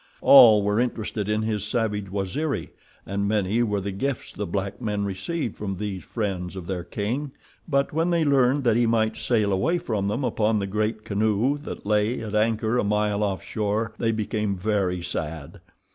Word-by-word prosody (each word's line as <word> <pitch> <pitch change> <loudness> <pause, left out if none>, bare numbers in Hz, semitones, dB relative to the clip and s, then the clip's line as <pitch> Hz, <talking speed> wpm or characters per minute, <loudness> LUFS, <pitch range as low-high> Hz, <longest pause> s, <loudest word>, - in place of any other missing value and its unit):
All 115 -7 +8
were 105 +2 +1
interested 110 -4 -2
in 105 0 +1
his 110 -2 -1
savage 105 -2 -1
Waziri, 100 - -2 0.3
and 100 +1 -2
many 105 +2 +1
were 105 -4 0
the 100 +1 -3
gifts 130 +7 -3
the 105 - -4
black 100 +5 -3
men 105 -3 -1
received 110 - -3
from 95 -2 -3
these 100 -1 -4
friends 95 -5 -3
of 95 -3 -6
their 90 -1 -3
king, 125 +10 -3 0.3
but 140 -3 +1
when 165 +3 +1
they 170 -2 +2
learned 135 0 +3
that 115 -3 +3
he 120 -1 +3
might 110 -1 +1
sail 105 -5 +1
away 95 - +1
from 110 - -2
them 110 +7 -1
upon 110 -3 +1
the 100 - -1
great 105 +2 -2
canoe 110 +5 +1
that 145 - -8
lay 105 +3 +1
at 110 -2 -6
anchor 110 +2 +1
a - - +1
mile 105 0 +1
off 100 -2 -1
shore 110 +1 -2
they 115 - +1
became 105 -2 -1
very 90 -3 0
sad. 80 -4 -5
105 Hz, 185 wpm, -25 LUFS, 100-115 Hz, 0.3 s, All